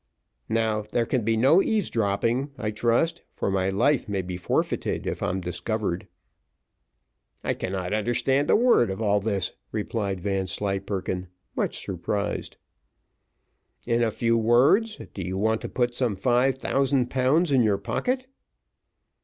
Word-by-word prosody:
"Now 110 -1 +1
there 105 +3 -1
can 125 0 0
be 115 +1 +1
no 135 - +5
eavesdropping, 120 - 0
I 105 -3 -2
trust, 120 +10 +1
for - - -2
my 95 0 +1
life 115 +6 +1
may 100 -2 -1
be 90 0 -5
forfeited, 90 - -1
if - - -3
I'm 95 +2 -1
discovered." 90 +2 -3 1.4
"I - - 0
cannot 95 0 -3
understand 120 +6 +1
a - - +6
word 235 - +4
of 95 - -4
all 105 -2 +2
this," 100 -2 -1 0.2
replied 105 -3 -2
Vanslyperken, 95 0 -2 0.3
much - - -2
surprised. 100 +3 -3 1.3
"In 120 0 +1
a 115 - +3
few 115 +1 +1
words, 135 - +4 0.2
do 95 - -5
you 95 +1 -3
want 110 +2 +1
to - - -5
put 120 -1 0
some 120 -4 0
five 125 +6 +2
thousand 135 -2 +1
pounds 140 +6 +2
in 130 -2 +5
your 105 -3 +3
pocket?" 255 - -2
110 Hz, 140 wpm, -25 LUFS, 100-130 Hz, 1.4 s, a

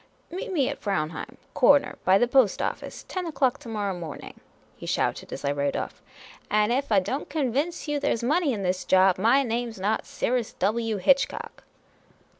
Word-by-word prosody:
" - - -37
Meet 390 +5 -5
me 285 -8 +1
at - - -4
Fraunheim; 160 -6 -3 0.2
cor 285 +3 +6
ner - - -6
by 190 +1 +5
the 240 - +3
Post 245 -5 +3
office; - - -4
ten 370 -2 -4
o'clock 270 -5 +1
to 235 - -10
morrow 205 -3 -2
morning," 170 -4 -8 0.4
he - - -10
shouted, - - -1
as - - -6
I 140 - +2
rode 140 0 -1
off, - - -5 0.3
" - - -20
and 210 +1 +2
ef 270 +1 -1
I 205 - +6
don't 260 +10 -4
convince 300 +4 -1
you 295 -1 0
there 280 - +1
's 230 - -7
money 305 +4 +2
in 205 -5 -3
this 180 0 -1
job, 185 -1 +4
my 240 +7 +4
name 240 -1 -2
's 220 - -12
not 205 +3 -1
Cyrus 245 -2 -1
W. 225 0 0
Hitchcock." 275 +9 0
230 Hz, 205 wpm, -26 LUFS, 195-275 Hz, 0.4 s, cor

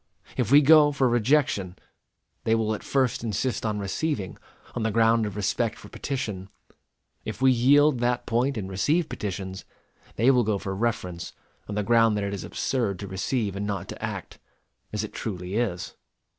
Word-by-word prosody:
If 125 -5 0
we 145 +1 +8
go 150 0 +7
for 135 -2 +2
rejection, 120 -6 +1 0.7
they 115 - +2
will 110 -1 0
at 105 - -5
first 130 -4 0
insist 115 +3 -1
on 105 -1 -1
receiving, 100 +2 -3 0.3
on 120 - -3
the 110 - +1
ground 115 0 +3
of 100 - -7
respect 110 +2 -1
for - - -13
petition. 105 -9 -4 0.7
If - - -6
we 130 0 +5
yield 135 +3 +4
that 120 0 0
point 120 +3 0
and 100 -3 -3
receive 145 - +1
petitions, 95 -1 -5 0.5
they 120 +5 +4
will 125 -2 +3
go 105 -2 0
for 95 0 -4
reference, 95 -5 -3 0.4
on 105 - -3
the 105 - 0
ground 115 -1 +4
that 100 - -1
it 100 0 -2
is 100 - -5
absurd 115 -8 -1
to 100 - -7
receive 100 +2 -2
and 100 +1 -3
not 100 -3 -3
to - - -8
act - - -5 0.5
as - - -2
it - - -7
truly 90 -3 -5
is. 105 -6 -2
110 Hz, 180 wpm, -26 LUFS, 100-125 Hz, 0.7 s, we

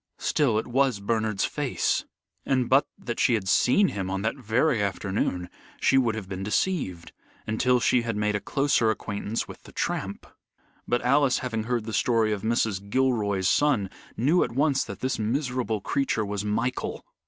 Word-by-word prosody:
Still 130 -8 +1
it 110 - -1
was 130 -3 +1
Bernard's 110 0 0
face, - - -1 0.4
and 130 -3 +1
but 135 +2 +4
that 120 -2 -5
she 120 - +4
had 100 -4 -3
seen 185 - +4
him 95 -2 -4
on 95 +1 -2
that 110 +3 0
very 125 +1 +1
afternoon, 95 -2 -1 0.3
she - - +3
would 120 -4 +3
have 105 -4 -6
been 95 -1 -5
deceived, 105 - -1 0.3
until 125 +3 +2
she 120 +2 +3
had 115 -2 -3
made 105 0 0
a - - 0
closer 135 -2 +1
acquaintance 105 +1 -3
with - - -11
the - - -14
tramp. - - -3 0.6
But 120 0 0
Alice, 135 +1 +3
having 115 -3 -2
heard 120 -2 -1
the 110 - -5
story 115 -3 +2
of 100 - -4
Mrs. 110 -3 -1
Gilroy's 105 -7 +1
son, 120 - +2 0.3
knew 150 +9 +3
at - - -4
once 140 +1 +2
that - - -8
this 130 -2 -1
miserable 125 -1 -1
creature 115 -2 0
was 100 0 -3
Michael. 110 +4 -2
115 Hz, 175 wpm, -26 LUFS, 105-130 Hz, 0.6 s, but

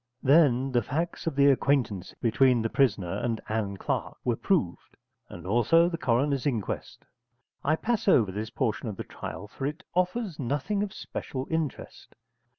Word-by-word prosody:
Then 135 -3 +4
the 120 -1 +3
facts 165 +9 -3
of 160 - -1
the 140 0 +5
acquaintance 125 -9 0
between 120 +1 +4
the 115 - -1
prisoner 100 -10 +1
and 115 -2 -1
Ann 105 -3 -2
Clark - - -3
were - - +1
proved, - - -1 0.3
and 85 - -10
also 120 - +4
the 170 - -3
coroner's 135 +3 +1
inquest. 115 -8 -3 0.6
I 155 +3 +3
pass 225 +5 -1
over 115 - +5
this 105 +3 -4
portion 120 -2 -2
of 100 - -6
the - - -4
trial, 105 - -7
for 135 +6 -4
it 155 +6 -6
offers 180 0 -1
nothing 145 - -1
of 205 -1 -2
special 130 -7 -5
interest. 160 -4 -4
135 Hz, 160 wpm, -28 LUFS, 110-160 Hz, 0.6 s, the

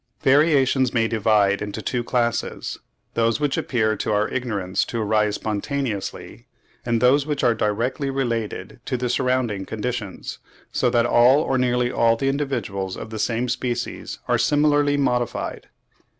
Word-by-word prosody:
Variations 135 -3 +3
may 115 - +3
be 115 - 0
divided 105 -3 +2
into 105 +1 -4
two 120 +2 -2
classes; 120 -1 -1 0.3
those 115 +1 +1
which 145 -2 0
appear 110 -3 0
to 110 - -2
our 105 0 +2
ignorance 100 -7 -1
to 115 - -4
arise 105 -1 +1
spontaneously, 110 0 -4 0.4
and 120 -1 0
those 135 +4 +4
which 150 -1 -2
are 120 - +4
directly 115 +6 -1
related 120 -5 -3
to 130 - -1
the 125 0 -2
surrounding 125 -6 0
conditions, 110 -1 -5 0.3
so 125 - +1
that 120 -1 +2
all 125 +4 +5
or 130 -4 0
nearly 125 -1 +1
all 115 -2 +3
the 135 +4 0
individuals 120 -10 -2
of 110 - -8
the 110 - -5
same 120 +2 0
species 120 -1 -3
are - - +2
similarly 145 -1 +3
modified. 125 -4 -1
120 Hz, 150 wpm, -23 LUFS, 110-130 Hz, 0.4 s, all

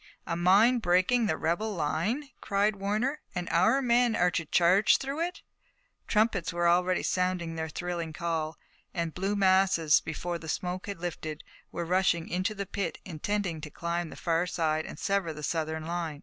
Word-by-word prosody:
"A 170 - -2
mine 200 +8 +5
breaking 200 +5 +3
the 160 - 0
rebel 205 +6 -1
line!" 185 - -1
cried 200 +1 +1
Warner, 215 +9 -1
"and 180 -1 -3
our 185 +12 +3
men 240 -1 +3
are 180 0 +3
to 165 - -2
charge 180 +6 +4
through 275 +3 -4
it!" 350 +2 -3 0.6
Trumpets 210 -5 +1
were 175 0 +1
already 180 +1 +2
sounding 180 -2 0
their 160 0 -4
thrilling 170 0 -4
call, 160 -1 -3 0.4
and 170 -2 -2
blue 195 +3 -1
masses, 185 -5 +4
before 170 +2 -4
the 160 - -8
smoke 180 +4 -3
had 200 -3 -5
lifted, 160 -3 -5 0.3
were 170 - -3
rushing 180 -1 +1
into 185 +5 -1
the 200 0 -3
pit, 195 -2 -3
intending 180 0 -2
to 150 - -7
climb 170 +2 -3
the - - -10
far 170 +1 0
side 160 -3 -1
and - - -8
sever 195 -4 0
the 150 0 -9
Southern 160 0 -2
line. 165 -3 -3
180 Hz, 175 wpm, -29 LUFS, 165-200 Hz, 0.6 s, mine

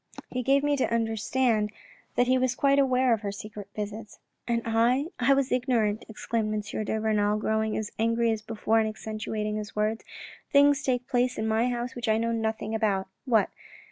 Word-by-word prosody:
He 255 - -1
gave 275 +3 +3
me 290 0 +2
to 260 - 0
understand 225 -1 +1 0.4
that 245 - +4
he 255 +1 +3
was 255 -1 +1
quite 275 +1 +3
aware 255 -2 +3
of 220 - -1
her 200 -2 -3
secret 205 0 -8
visits." 210 +1 -6 0.2
" - - -50
And 235 -1 0
I 235 +6 +2
— - - -43
I 265 +3 +4
was 275 -1 0
ignorant," 240 -4 +1
exclaimed 220 0 -2
M. 210 0 -3
de 220 +1 -1
Renal, 210 -1 +1
growing 220 0 0
as 215 -1 -4
angry 230 +1 +2
as 220 -1 -2
before 225 +1 0
and 220 -1 +1
accentuating 215 0 -4
his 210 0 -6
words. 215 +1 0 0.3
" - - -20
Things 285 0 +5
take 250 -3 -1
place 250 -1 +1
in 220 - -1
my 220 +3 +2
house 245 +1 -3
which 240 -2 -5
I 220 - +4
know 230 +1 0
nothing 220 -1 -2
about.... 205 -4 0 0.2
What 225 -5 +3
225 Hz, 205 wpm, -27 LUFS, 215-250 Hz, 0.4 s, Things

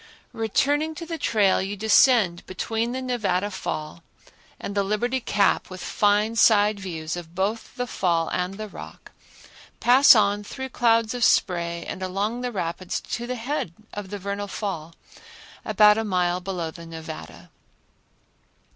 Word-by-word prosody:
Returning 290 +8 0
to 335 - -7
the 330 -1 -5
trail 205 -5 +2
you 200 +2 -4
descend 215 -4 +4
between 225 +5 -2
the 260 +1 -4
Nevada 205 -6 -1
Fall 155 - -5 0.6
and 200 - -5
the 200 - +1
Liberty 215 +6 -1
Cap 205 -4 +1
with 185 0 -8
fine 210 +2 +2
side 210 -2 +4
views 165 -4 -5
of 170 -1 -9
both 205 +6 -2
the 245 -1 -2
fall 170 -7 0
and 180 +1 -2
the 215 +1 -6
rock, - - -11 0.7
pass 260 +2 +7
on 205 -1 +2
through 265 +5 -6
clouds 230 -2 +2
of 245 -1 -2
spray 170 -4 +1
and 190 - -6
along 200 +6 -2
the 250 0 -3
rapids 185 -2 -3
to 240 0 -5
the 250 - -3
head 245 - -3 0.2
of 205 -2 -6
the 205 - -5
Vernal 200 +1 -4
Fall, 170 -6 -5 0.7
about 210 0 +5
a - - -1
mile 180 -3 0
below 180 -3 -4
the 170 0 -11
Nevada. 160 -1 -9
205 Hz, 155 wpm, -24 LUFS, 180-230 Hz, 0.7 s, pass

